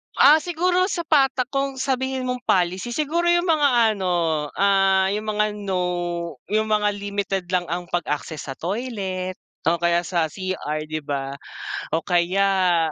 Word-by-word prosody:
Ah, 300 +3 +7
siguro 355 +3 +1
sa 375 -3 -2
pata 275 -5 +3
kung 275 0 -1
sabihin 265 0 -1
mong 250 0 -2
policy, 185 +6 +1
siguro 310 +4 0
'yong 345 0 +3
mga 295 -3 +4 0.3
ano, 170 -5 0
ah, 195 -1 +3
'yong 210 +2 -2
mga, 210 0 +1 0.2
no. 175 -4 -2 0.2
'Yong 215 0 +1
mga 210 -1 +3
limited 200 -2 -2
lang 180 -1 +1
ang 175 +1 -4
pag-access 160 -3 -3
sa 135 - -5
toilet 190 - -3 0.3
o 170 +1 +2
kaya 170 0 +2
sa 170 -3 0
CR, 155 -5 -4
'di 155 0 -4
ba, 140 -1 -3 0.6
o 165 - -1
kaya, 180 -2 +2
190 Hz, 150 wpm, -23 LUFS, 175-255 Hz, 0.6 s, Ah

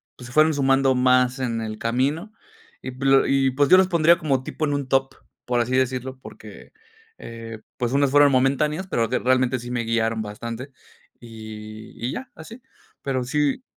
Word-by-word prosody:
pues 125 - -11
se 120 - -12
fueron 155 +1 +4
sumando 135 -1 +2
más 125 0 +2
en 115 -3 -2
el 110 -1 -5
camino 135 - -1 0.5
Y 130 - -6
p 130 +2 -7
l 135 0 +4
y, 135 -1 +2
pues 140 +2 +1
yo 185 - +8
los 190 0 +4
pondría 170 -1 +4
como 135 -5 -1
tipo 155 - -3
en 145 - -1
un 140 -2 -3
top, 135 0 0 0.3
por 120 -1 +1
así 125 +2 -1
decirlo, 130 0 -2
porque, - - -13 0.5
eh, 115 -1 -9 0.2
pues 120 -1 -2
unas 140 0 +2
fueron 145 0 +5
momentáneas, 140 +7 +1
pero 115 -11 0
de 125 +3 -1
realmente 130 0 +1
sí 120 +1 -8
me 120 -1 -2
guiaron 115 -1 -1
bastante. 115 +5 -7 0.5
Y 110 -2 -10
y 125 - -2
ya, 260 0 -7
así. 225 +10 -12 0.4
Pero 130 -2 -2
sí. 145 - -1
130 Hz, 185 wpm, -23 LUFS, 120-140 Hz, 0.5 s, yo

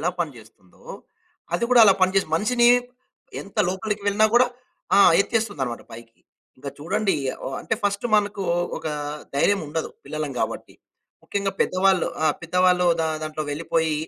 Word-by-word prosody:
ఎలా 175 +4 0
పనిజేస్తుందో, 110 - -8 0.7
అది 205 - 0
కూడా 245 -2 +7
అలా 195 -3 +6
పనిజేస్ 185 -2 +2
మనిషినీ 240 +7 +3 0.7
ఎంత 200 - -11
లోపలికి 205 +2 -4
వెళ్ళినా 210 +2 +4
గూడా 250 +1 +6 0.5
ఆ! - - +6 0.2
ఎత్తేస్తుందనమాట 200 - -2
పైకి. 115 0 -13 0.4
ఇంక 140 - -7
చూడండీ 195 +5 0 0.3
ఓ - - -2
అంటే, 225 - -2
ఫస్టు 200 +3 0
మనకూ 205 -1 +1 0.4
ఒకా 155 - -4 0.4
ధైర్యముండదు 160 -1 0 0.2
పిల్లలం 155 -2 -4
గాబట్టి. - - -4 0.5
ముఖ్యంగా 200 -1 -2
పెద్దవాళ్ళు 185 0 +2 0.2
ఆ! - - +4 0.2
పెద్దవాళ్ళు 180 +1 +2
దా 160 - 0
దాంట్లో 155 0 -4
వెళ్లిపోయి 160 +1 -1
185 Hz, 130 wpm, -23 LUFS, 155-205 Hz, 0.7 s, కూడా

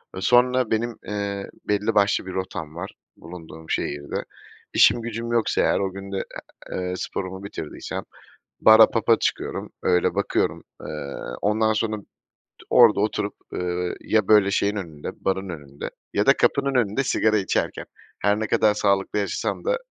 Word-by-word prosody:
Eee, 95 - -5
sonra 125 +2 +3
benim, 115 +1 0
eee, 100 -1 -3 0.2
belli 105 +1 +1
başlı 100 -2 +3
bir 95 - -6
rotam 85 -4 -5
var 90 +3 -6 0.3
bulunduğum 80 -1 -11
şehirde. 70 0 -2 0.5
İşim 120 - +5
gücüm 115 0 -4
yoksa 115 -2 +2
eğer - - +2
o 95 -1 -1
gün 100 0 -8
de, 95 - -2 0.5
eee, 90 0 -2
sporumu 95 +1 -5
bitirdiysem 80 -6 -6 0.6
bara, 110 0 +8
pub'a 115 0 +3
çıkıyorum, - - -2
öyle 90 -1 +2
bakıyorum. - - 0 0.2
Eee, - - -8 0.6
ondan 110 +2 +2
sonra 110 0 -1
t 100 - -14 0.7
orada 115 -5 +6
oturup, 105 0 -1 0.2
ııı, 90 0 -2
ya 110 -3 +1
böyle 105 -2 +5
şeyin 100 +1 +1
önünde, 80 -7 -6 0.2
barın 95 0 0
önünde 70 -4 -7 0.2
ya - - +2
da - - +7
kapının 140 -1 +2
önünde 120 +1 +2
sigara 110 -4 +2
içerken 95 -2 -1 0.3
her 105 +1 +2
ne 110 - -1
kadar 105 +1 +3
sağlıklı 100 0 +1
yaşasam 100 - -2
da - - +2
100 Hz, 155 wpm, -24 LUFS, 95-110 Hz, 0.7 s, bara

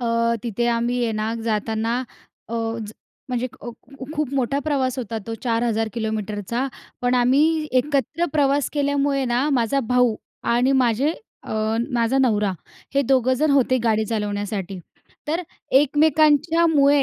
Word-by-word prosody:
अ, 230 -1 +1
तिथे 235 0 -1
आम्ही 235 +1 0
आहे 225 - -1
ना, 215 +1 -2
जाताना 225 +1 -1 0.5
अ, 230 - -5 0.3
ज 210 - -9 0.4
म्हणजे 250 0 -1
अ, 240 - -7
ख 270 +3 -11
खूप 300 -3 -2
मोठा 270 +1 0
प्रवास 265 -3 0
होता 225 -2 -3
तो 225 - -3
4,000 230 -2 0
किलोमीटरचा. 220 +1 -2 0.4
पण 245 0 +2
आम्ही 250 +3 +4 0.4
एकत्र 290 +4 -1
प्रवास 285 -2 +2
केल्यामुळे 285 -1 +1
ना, 250 +5 +1
माझा 265 0 +1
भाऊ 250 -3 +4 0.4
आणि 250 +3 +3
माझे 250 +6 +1 0.3
अ, - - -7 0.4
माझा 235 +3 +2
नवरा, 210 -6 +2 0.4
हे 280 - +3
दोघं 260 -1 +3
जण 310 - +3
होते 260 -2 +3
गाडी 220 -1 +2
चालवण्यासाठी. 205 -3 -3 0.5
तर 330 +4 0 0.4
एकमेकांच्यामुळे 300 0 +4
245 Hz, 135 wpm, -22 LUFS, 225-280 Hz, 0.5 s, आम्ही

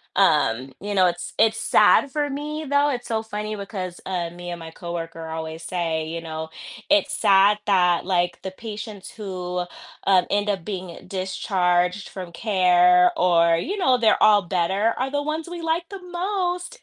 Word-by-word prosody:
um, 125 +4 +2
you 205 0 -4
know, 185 -1 +5
it's 175 0 -4
it's 225 0 +3
sad 275 +4 +4
for 295 -1 -1
me 300 +2 -4
though, 285 +1 +3
it's 245 -3 -4
so 225 -1 -1
funny 215 0 -5
because, 190 -3 -6
uh, 175 -3 -2
me 175 0 -9
and 170 - -6
my 160 0 -9
co-worker 165 -1 -6
always 160 0 -6
say, 160 -3 -2
you 165 +1 -5
know, 160 -1 -6 0.4
it's 300 -1 +3
sad 200 -6 +4
that, 180 -3 +3
like, 175 -2 0
the 190 - -4
patients 215 -1 -8
who, 180 -5 -4 0.4
um, 185 -2 +5
end 205 +1 0
up 190 -5 -2
being 185 -4 -7
discharged 185 -1 0
from 185 -3 -8
care 180 -3 +4
or, 170 -2 +4
you 395 - -3
know, 260 -9 +3
they're 225 -3 +3
all 210 -1 +6
better, 190 +5 0
are 265 +2 -2
the 290 0 -1
ones 315 +2 -3
we 350 -1 -6
like 330 +1 -1
the 390 -2 -8
most. 360 +4 -2
190 Hz, 175 wpm, -23 LUFS, 175-240 Hz, 0.4 s, all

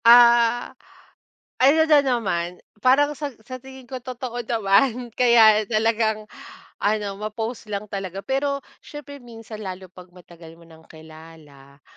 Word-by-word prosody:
Ah, 235 0 +6 0.9
ano 280 +5 +5
na 300 - +7
naman 180 -8 -2 0.2
parang 285 +5 +2
sa 290 -3 -5
sa 255 +3 -8
tingin 265 +1 -13
ko 260 - -4
totoo 245 -1 -6
naman 230 +3 +1
kaya 220 -4 +5
talagang 220 -1 0 0.5
ano, 205 -1 -1
ma-post 220 +2 -5
lang 205 +1 -4
talaga. 195 -1 -5
Pero 280 +2 -1 0.2
siyempre 290 -1 -10
minsan 225 -3 -11
lalo 185 0 -7
'pag 180 0 -15
matagal 170 -2 -15
mo 170 - -20
ng 160 0 -18
kilala 155 -3 -16
220 Hz, 130 wpm, -23 LUFS, 185-250 Hz, 0.9 s, na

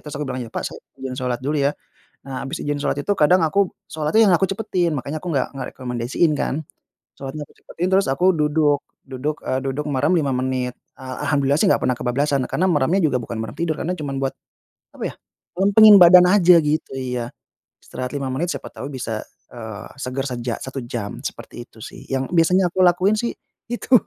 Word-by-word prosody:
Terus 150 - -6
aku - - -2
bilang, 130 -1 -3
"Ya, - - -7
Pak - - -3
saya - - -10 0.2
izin 130 -1 -5
sholat 125 -1 -2
dulu 145 +3 -1
ya." 140 +1 +2 0.5
Nah 135 -1 -5
habis 135 - -4
ijin 145 0 -2
sholat - - -1
itu 205 - 0
kadang 175 +5 +5
aku 195 +3 +1 0.2
sholatnya 160 +9 +3
yang - - +5
aku 190 - +1
cepetin, 195 -4 -1
makanya 140 +3 -4
aku 180 - -4
nggak 130 - +1
nggak 135 -2 -5
rekomendasiin 125 +5 0
kan. 150 +2 -2 0.6
Sholatnya 140 +2 -6
aku - - -24
cepetin 175 - -4
terus 195 +1 +4
aku 180 +7 +3
duduk, 150 -2 +2 0.2
duduk, 135 +3 -3
eee, 130 - 0
duduk 135 +2 -3
merem 145 +5 +2
5 145 -5 +1
menit. 125 -1 -1 0.2
Ah, 130 -1 -7
alhamdulillah 140 -1 +2
sih 205 - +4
nggak - - +2
pernah 125 - +2
kebablasan 140 +3 0
karena 185 - +1
meremnya 155 +3 +2
juga 140 -5 +2
bukan 115 0 -6
merem 110 -1 -5
tidur, 165 -2 -1
karena 175 - -1
cuman 145 -4 -4
buat, 135 - -1 0.6
apa - - -7
ya, - - -22 0.4
lempengin 205 +2 +7
badan 180 +1 +9
aja 180 -3 +6
gitu, 150 +1 -1
iya. 125 -2 -3 0.5
Istirahat 125 +1 -6
5 140 -2 -2
menit 170 +7 -1
siapa - - -7
tahu 140 - -7
bisa, 115 -4 -4 0.3
eee, 110 -3 -8
segar 135 0 -3
seja 120 -1 -3
1 130 0 -5
jam. 115 -4 -5
Seperti 120 - -7
itu 110 - -20
sih, - - -10
yang 135 -1 -1
biasanya 180 +2 +3
aku 185 +2 -1
lakuin 185 +4 +3
sih 235 +2 -2 0.4
itu. 240 +2 -3
145 Hz, 200 wpm, -21 LUFS, 130-175 Hz, 0.6 s, badan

